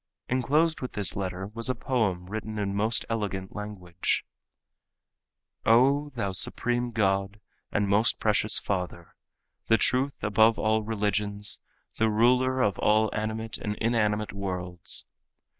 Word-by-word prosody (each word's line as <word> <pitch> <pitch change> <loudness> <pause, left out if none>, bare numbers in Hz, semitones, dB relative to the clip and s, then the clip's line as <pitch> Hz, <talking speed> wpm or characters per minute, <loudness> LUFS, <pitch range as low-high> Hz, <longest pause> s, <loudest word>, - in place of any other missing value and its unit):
Enclosed 150 +6 +1
with 130 - -5
this 105 -4 +1
letter 95 -1 -3
was 115 +2 -2
a 130 - 0
poem 100 -9 -1
written 110 +2 -5
in 100 -1 -1
most 110 +3 +1
elegant 100 -4 -3
language. 95 -5 -3 1.4
"O 135 +6 +4
thou 100 -5 -1
Supreme 120 +6 +1
God 100 -2 0 0.3
and 100 -1 +1
most 105 +4 +2
precious 105 0 +4
Father, 90 -3 -3 0.5
The 115 - +5
truth 130 +5 0
above 110 +2 +4
all 110 0 +1
religions, 105 -1 -2 0.4
The 110 0 +3
Ruler 125 +4 +3
of 100 -3 0
all 110 +1 +3
animate 110 +1 -3
and 105 0 -3
inanimate 105 -2 0
worlds! 90 -3 -3
105 Hz, 125 wpm, -27 LUFS, 100-115 Hz, 1.4 s, The